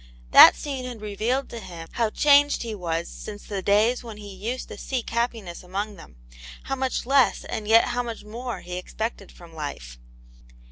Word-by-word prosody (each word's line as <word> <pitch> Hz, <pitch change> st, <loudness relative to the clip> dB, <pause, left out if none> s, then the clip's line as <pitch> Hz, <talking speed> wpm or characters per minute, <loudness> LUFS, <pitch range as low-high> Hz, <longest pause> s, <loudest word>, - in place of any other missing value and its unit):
That -, -, +10 dB
scene 270 Hz, -3 st, -5 dB
had 245 Hz, -3 st, -7 dB
revealed 215 Hz, +6 st, -1 dB
to 235 Hz, -, -7 dB
him 170 Hz, -5 st, -9 dB
how 230 Hz, -2 st, 0 dB
changed 290 Hz, +3 st, +4 dB
he 230 Hz, -2 st, -4 dB
was 170 Hz, -4 st, -3 dB
since 205 Hz, -1 st, -9 dB
the 200 Hz, -2 st, -4 dB
days 215 Hz, +6 st, +2 dB
when 225 Hz, -3 st, -9 dB
he 205 Hz, -1 st, -9 dB
used 225 Hz, +7 st, -4 dB
to -, -, -8 dB
seek 255 Hz, -4 st, -3 dB
happiness 230 Hz, -6 st, -2 dB
among 200 Hz, +3 st, -4 dB
them; 165 Hz, -, -14 dB, 0.5 s
how 270 Hz, -, -2 dB
much 260 Hz, -2 st, -2 dB
less 270 Hz, 0 st, +3 dB
and 210 Hz, -, -5 dB
yet 225 Hz, +1 st, +5 dB
how 245 Hz, -, 0 dB
much 230 Hz, -2 st, -6 dB
more 235 Hz, +3 st, -6 dB
he 180 Hz, 0 st, -6 dB
expected 220 Hz, +1 st, -5 dB
from 170 Hz, -2 st, -15 dB
life. 100 Hz, -, -7 dB
220 Hz, 185 wpm, -25 LUFS, 190-245 Hz, 0.5 s, That